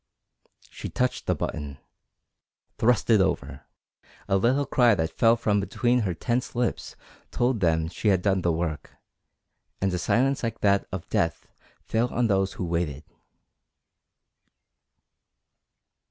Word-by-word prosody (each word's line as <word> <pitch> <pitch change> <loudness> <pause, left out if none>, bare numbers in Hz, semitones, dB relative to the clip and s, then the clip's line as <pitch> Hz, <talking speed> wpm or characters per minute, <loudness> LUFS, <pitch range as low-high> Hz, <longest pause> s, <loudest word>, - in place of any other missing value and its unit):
She - - -7
touched 125 0 -2
the - - +2
button 75 -3 -5 1.0
thrust 115 -1 +2
it 110 -3 +6
over. 70 -8 -2 0.6
A 95 - +2
little 130 +8 +2
cry 120 -5 +4
that 80 -3 -1
fell 115 +6 +4
from 105 -3 +1
between 120 +5 +1
her 95 -7 -1
tense 120 +9 -2
lips 120 -1 -2 0.3
told 120 -1 0
them 80 -3 +1
she 90 +5 -4
had 95 -3 +3
done 95 -2 +2
the 85 - +1
work, 80 -2 -4 0.8
and 95 -1 0
a 90 - -1
silence 135 +9 +1
like 115 -1 -4
that 100 -1 +2
of 95 -3 -6
death - - -1 0.4
fell 115 +2 0
on 120 - +1
those 95 -3 +1
who 90 - -4
waited. 85 -4 -2
100 Hz, 135 wpm, -26 LUFS, 85-120 Hz, 1.0 s, it